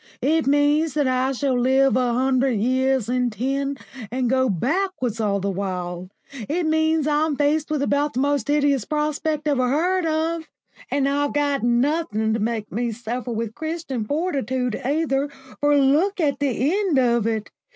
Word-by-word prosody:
It 315 Hz, +1 st, +2 dB
means 290 Hz, +2 st, +2 dB
that 295 Hz, -2 st, +2 dB
I 255 Hz, +1 st, +1 dB
shall 270 Hz, 0 st, 0 dB
live 265 Hz, +2 st, +3 dB
a 250 Hz, -2 st, +1 dB
hundred 260 Hz, 0 st, +2 dB
years 260 Hz, +1 st, +1 dB
in 250 Hz, 0 st, +1 dB
ten 275 Hz, +5 st, -2 dB, 0.3 s
and 250 Hz, 0 st, -1 dB
go 260 Hz, -1 st, +2 dB
backwards 255 Hz, -, -1 dB
all 200 Hz, -2 st, +1 dB
the 200 Hz, +1 st, -1 dB
while. 180 Hz, -2 st, -4 dB, 0.4 s
It 335 Hz, +3 st, 0 dB
means 315 Hz, -1 st, +2 dB
I'm 300 Hz, 0 st, +1 dB
faced 295 Hz, +2 st, +1 dB
with 300 Hz, -2 st, 0 dB
about 285 Hz, +1 st, 0 dB
the -, -, 0 dB
most 285 Hz, -3 st, 0 dB
hideous 285 Hz, -4 st, +2 dB
prospect 300 Hz, +1 st, -2 dB
ever 260 Hz, -4 st, +2 dB
heard 350 Hz, +5 st, +1 dB
of. 320 Hz, +1 st, -1 dB, 0.4 s
And 280 Hz, -1 st, +1 dB
I've 285 Hz, +1 st, 0 dB
got 285 Hz, -1 st, +1 dB
nothing 240 Hz, -2 st, +1 dB
to 225 Hz, -, -1 dB
make 220 Hz, -1 st, -2 dB
me 235 Hz, +3 st, -1 dB
suffer 240 Hz, +2 st, -5 dB
with 225 Hz, -1 st, -3 dB
Christian 315 Hz, -4 st, -4 dB
fortitude 260 Hz, -, -1 dB
either, 285 Hz, 0 st, 0 dB, 0.3 s
for 290 Hz, 0 st, +3 dB
look 305 Hz, +9 st, +2 dB
at 295 Hz, -4 st, +1 dB
the 280 Hz, +2 st, 0 dB
end 390 Hz, -7 st, +1 dB
of 235 Hz, -3 st, +2 dB
it! 220 Hz, -2 st, -2 dB
275 Hz, 165 wpm, -22 LUFS, 240-300 Hz, 0.4 s, live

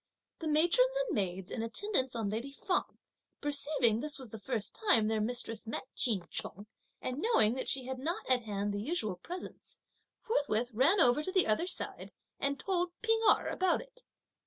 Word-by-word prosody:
The 325 Hz, -, -4 dB
matrons 345 Hz, +12 st, +3 dB
and -, -, 0 dB
maids 190 Hz, -, -2 dB
in 225 Hz, -, -3 dB
attendance 260 Hz, -, 0 dB
on 220 Hz, -3 st, -1 dB
lady 230 Hz, +6 st, -3 dB
Feng, 360 Hz, +6 st, -2 dB, 0.4 s
perceiving 285 Hz, -6 st, +2 dB
that -, -, -4 dB
this 295 Hz, -, -1 dB
was 260 Hz, -6 st, -8 dB
the 220 Hz, -, -7 dB
first 215 Hz, -1 st, -2 dB
time 230 Hz, -, +3 dB
their 220 Hz, -1 st, +1 dB
mistress 225 Hz, -1 st, -2 dB
met 225 Hz, -, -3 dB
Ch'in 210 Hz, -8 st, 0 dB
Chung, 205 Hz, +3 st, -4 dB, 0.4 s
(and 255 Hz, +3 st, -3 dB
knowing) 290 Hz, -, +4 dB
that 260 Hz, -, -3 dB
she 265 Hz, -2 st, 0 dB
had 260 Hz, 0 st, -4 dB
not 325 Hz, +6 st, -3 dB
at 255 Hz, -1 st, +3 dB
hand 205 Hz, -2 st, -2 dB
the 205 Hz, -, -2 dB
usual 215 Hz, -, -1 dB
presents, 355 Hz, -, -8 dB, 0.4 s
forthwith 250 Hz, -, 0 dB
ran 285 Hz, -, +4 dB
over 250 Hz, -2 st, +5 dB
to 375 Hz, -, -4 dB
the 375 Hz, -1 st, +3 dB
other 220 Hz, +12 st, +1 dB
side -, -, -2 dB, 0.3 s
and 280 Hz, 0 st, -1 dB
told 360 Hz, -2 st, -1 dB
P'ing 450 Hz, 0 st, +2 dB
Erh -, -, +3 dB
about 370 Hz, -1 st, +2 dB
it. -, -, -13 dB
260 Hz, 185 wpm, -32 LUFS, 220-350 Hz, 0.4 s, over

